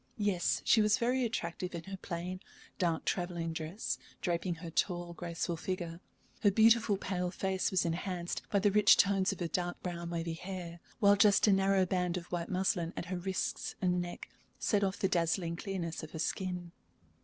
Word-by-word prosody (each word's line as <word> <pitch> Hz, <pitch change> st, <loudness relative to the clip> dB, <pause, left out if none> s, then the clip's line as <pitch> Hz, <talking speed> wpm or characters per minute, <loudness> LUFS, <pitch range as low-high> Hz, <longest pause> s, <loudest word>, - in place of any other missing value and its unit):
Yes, 200 Hz, -4 st, +1 dB
she 220 Hz, -, +6 dB
was 210 Hz, -1 st, +4 dB
very 255 Hz, +1 st, +1 dB
attractive 180 Hz, -5 st, -3 dB
in 165 Hz, -, -5 dB
her 195 Hz, +1 st, -7 dB
plain, 180 Hz, 0 st, -5 dB, 0.4 s
dark 170 Hz, -4 st, 0 dB
travelling 175 Hz, -2 st, -1 dB
dress 160 Hz, +6 st, -3 dB, 0.2 s
draping 175 Hz, 0 st, -1 dB
her 165 Hz, 0 st, -8 dB
tall, 175 Hz, 0 st, -1 dB
graceful 170 Hz, 0 st, -3 dB
figure; 170 Hz, -1 st, -4 dB, 0.4 s
her 205 Hz, -, +6 dB
beautiful, 220 Hz, 0 st, +5 dB
pale 180 Hz, -2 st, -2 dB
face 190 Hz, +1 st, -1 dB
was 185 Hz, -2 st, +1 dB
enhanced 175 Hz, +1 st, -2 dB
by 205 Hz, -, +2 dB
the 200 Hz, +1 st, +3 dB
rich 210 Hz, +1 st, +6 dB
tones 195 Hz, -1 st, +3 dB
of 195 Hz, -, -6 dB
her 175 Hz, -, -1 dB
dark 175 Hz, +1 st, -2 dB
brown, 170 Hz, -1 st, -4 dB
wavy 165 Hz, -1 st, -2 dB
hair, 175 Hz, -1 st, -6 dB, 0.2 s
while 200 Hz, -2 st, +6 dB
just 205 Hz, -1 st, +5 dB
a 205 Hz, -, +5 dB
narrow 195 Hz, 0 st, +3 dB
band 180 Hz, -1 st, 0 dB
of 175 Hz, -1 st, -8 dB
white 170 Hz, -1 st, -2 dB
muslin 180 Hz, -2 st, 0 dB
at -, -, -3 dB
her -, -, -1 dB
wrists 185 Hz, +1 st, -2 dB
and 180 Hz, -1 st, +1 dB
neck 175 Hz, 0 st, -6 dB, 0.3 s
set 205 Hz, -2 st, +1 dB
off 190 Hz, 0 st, 0 dB
the 195 Hz, -, +1 dB
dazzling 170 Hz, -1 st, 0 dB
clearness 175 Hz, -3 st, -4 dB
of 155 Hz, -, -8 dB
her -, -, -5 dB
skin. 180 Hz, +1 st, -2 dB
180 Hz, 185 wpm, -32 LUFS, 170-195 Hz, 0.4 s, she